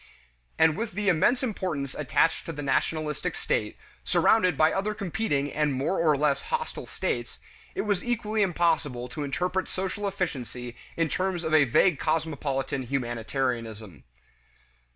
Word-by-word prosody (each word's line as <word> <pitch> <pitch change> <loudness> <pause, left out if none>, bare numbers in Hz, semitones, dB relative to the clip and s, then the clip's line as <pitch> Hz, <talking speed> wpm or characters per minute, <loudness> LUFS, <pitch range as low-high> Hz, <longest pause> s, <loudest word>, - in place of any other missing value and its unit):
And 160 -1 +5
with 220 0 -3
the 205 +1 +1
immense 240 +10 +3
importance 175 - -2
attached 150 +3 +1
to - - -2
the 145 -2 -6
nationalistic 150 - 0
state, 450 +3 -1 0.3
surrounded 185 -5 +3
by 155 0 +4
other 210 +2 -1
competing 180 -8 -1
and 150 -1 +1
more 140 +8 0
or 155 -3 +4
less 140 -1 +2
hostile 475 0 -3
states, - - -3 0.4
it - - 0
was 205 -4 0
equally 220 -3 0
impossible 165 -9 +1
to 150 +3 -4
interpret 180 +6 -1
social 190 +2 -3
efficiency 125 - -4 0.2
in 165 -1 +2
terms 185 +1 -1
of 160 -1 -2
a 155 -2 +7
vague 145 +6 +3
cosmopolitan 145 -4 -1
humanitarianism. 120 - -3
160 Hz, 140 wpm, -27 LUFS, 140-190 Hz, 0.4 s, a